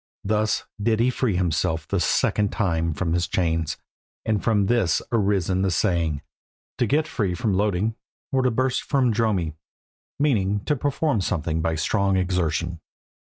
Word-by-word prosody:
Thus 105 +1 0 0.2
did 110 +1 +2
he 125 +2 +3
free 120 -5 0
himself 80 -3 0
the - - 0
second 105 -1 +1
time 85 -6 0
from 85 +1 -1
his 85 0 +1
chains, 80 -3 0 0.5
and 110 -3 0
from 105 -3 +2
this 105 -5 +2
has - - -7
arisen 95 -4 +1
the 95 - +2
saying, 80 -4 0 0.6
"To 120 - +2
get 155 +6 +2
free 95 -6 -1
from 100 +3 0
Loeding, 105 +2 +1 0.4
or 135 - +2
to 130 - +3
burst 130 +2 0
from 130 -5 +1
Dromi," 100 -8 0 0.6
meaning 105 -9 +1
to 150 - +1
perform 145 -3 0
something 80 -2 -1
by 80 0 0
strong 95 +4 +1
exertion. 85 -2 -1
100 Hz, 155 wpm, -24 LUFS, 85-115 Hz, 0.6 s, he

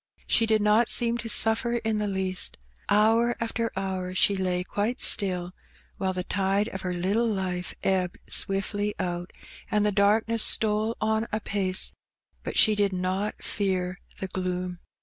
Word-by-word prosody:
She 225 - +3
did 220 -1 +2
not 215 +3 +3
seem 235 0 +3
to 235 - -5
suflFer 230 +2 +3
in 220 -1 0
the 210 - -1
least. 190 -1 -3 0.3
Hour 225 +3 +3
after 230 0 -2
hour 185 -1 -3
she 200 +2 +4
lay 180 -1 -1
quite 210 +7 -2
still, 180 -3 +2 0.5
while 190 -1 -1
the 180 -1 -3
tide 195 +2 0
of 190 - -6
her 180 - -3
little 195 +7 0
life 185 -4 -3
ebbed 185 -2 0
swiftly 205 +1 -2
out, 175 -1 -4 0.4
and 210 0 +1
the 210 - +2
darkness 215 +3 +3
stole 215 +1 +3
on 220 +1 0
apace; 200 -3 -1 0.5
but - - -4
she 215 - +6
did 205 -2 +1
not 185 +3 -3
fear 185 -2 -2 0.2
the 190 - -3
gloom. 180 -1 -4
200 Hz, 155 wpm, -26 LUFS, 185-220 Hz, 0.5 s, she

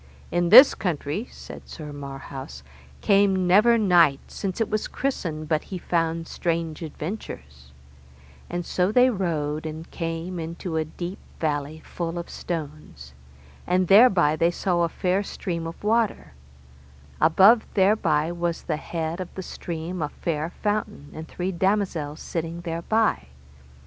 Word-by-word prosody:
In 175 0 +1
this 255 +8 +10
country, 175 - -3
said - - -11
Sir 150 -3 -8
Marhaus, 135 - -8 0.4
came 195 -2 +3
never 215 +6 +5
knight 175 -9 +4
since 195 0 -4
it 225 - +1
was 215 0 -2
christened 165 - -3
but 155 0 0
he 190 - -6
found 165 -1 -1
strange 165 -2 -2
adventures; 70 - -7 0.8
and 175 -1 -3
so 180 +2 0
they 250 +3 +5
rode, 160 -6 -2
and 155 +1 -8
came 165 +1 -4
into 165 +1 -5
a 160 0 0
deep 175 +4 -7 0.2
valley 150 0 -2
full 170 0 -4
of 170 - -6
stones, 150 - -6 0.5
and 180 0 +1
thereby 195 -8 +6
they 165 +2 +2
saw 175 0 0
a 170 - +2
fair 185 +4 0
stream 170 -4 -4
of 165 - -9
water; 220 - 0 0.9
above 195 +9 +6
thereby 180 -6 +2
was 170 -1 -2
the 155 - -2
head 160 +1 -4
of 185 - -5
the 190 - -5
stream 170 +1 -5
a 150 - -1
fair 155 0 -3
fountain, 210 -7 -2
and 160 +1 -8
three 185 +1 -3
damosels 180 -5 -1
sitting 165 0 -4
thereby. 170 - 0
170 Hz, 140 wpm, -25 LUFS, 155-190 Hz, 0.9 s, this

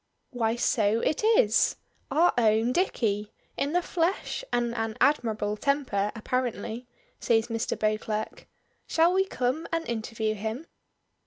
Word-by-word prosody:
"Why, 230 -3 0
so 225 -2 +1
it 310 - 0
is! 460 +3 +4 0.3
Our 320 +6 +4
own 225 0 +3
Dicky, 215 - 0 0.2
in 285 +2 -1
the 355 0 +2
flesh 345 +8 -1
and 240 -1 0
an 225 -1 -3
admirable 220 -7 +1
temper 255 -7 0
apparently," 240 0 -3 0.3
says 225 0 +2
Mr. 225 -1 -2
Beauclerk. 215 0 -2 0.4
"Shall 335 +2 +3
we 385 +1 +3
come 260 +1 -1
and 330 0 -2
interview 220 -1 -2
him?" 220 +8 -4
235 Hz, 130 wpm, -27 LUFS, 220-295 Hz, 0.4 s, is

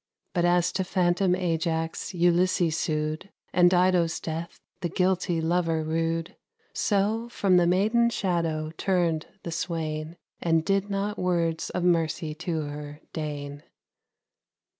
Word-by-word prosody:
But 175 -2 +2
as 175 0 +3
to 190 - -1
phantom 180 0 +2
Ajax 165 -2 -1
Ulysses 175 -1 +3
sued, 155 +4 -2 0.2
And 175 -1 +6
Dido's 180 -2 +3
death 165 +1 -5 0.2
the 175 -2 -2
guilty 180 -1 +1
lover 165 -1 +1
rued, 165 +1 -1 0.4
So 215 +3 0
from 195 -5 +3
the 175 -1 +4
maiden's 220 +6 +3
shadow 165 -4 -1
turned 170 -4 +1 0.2
the 170 - -5
swain, 160 -1 -3 0.2
And 165 -1 +2
did 195 +1 +1
not 200 +1 -2
words 170 -3 0
of 180 - -2
mercy 165 -2 +1
to 160 0 -3
her 145 0 -7
deign. 145 -2 -5
170 Hz, 125 wpm, -27 LUFS, 160-185 Hz, 0.4 s, And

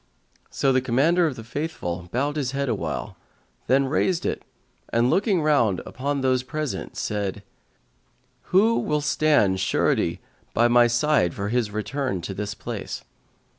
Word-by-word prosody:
So 135 -1 +1
the 130 - +3
Commander 155 +8 +3
of 145 - -3
the 115 - -9
Faithful 95 - -4
bowed 140 +6 0
his 135 -4 -2
head 140 -1 -1
awhile, 110 -4 -3 0.5
then 135 +2 +4
raised 165 +5 0
it - - -1 0.5
and 120 +2 +2
looking 195 -4 +2
round 120 -11 +3
upon 140 +2 -3
those 130 -1 +2
present, 150 +2 -4
said, 105 -1 -3 1.0
"Who 220 +5 +3
will 150 0 0
stand 145 -10 +2
surety 90 - +1 0.4
by 120 +1 +5
me 120 0 +6
for 115 - +1
his 120 -2 0
return 110 -1 -2
to 95 - -5
this 105 +1 -4
place?" - - -6
130 Hz, 140 wpm, -24 LUFS, 110-150 Hz, 1.0 s, me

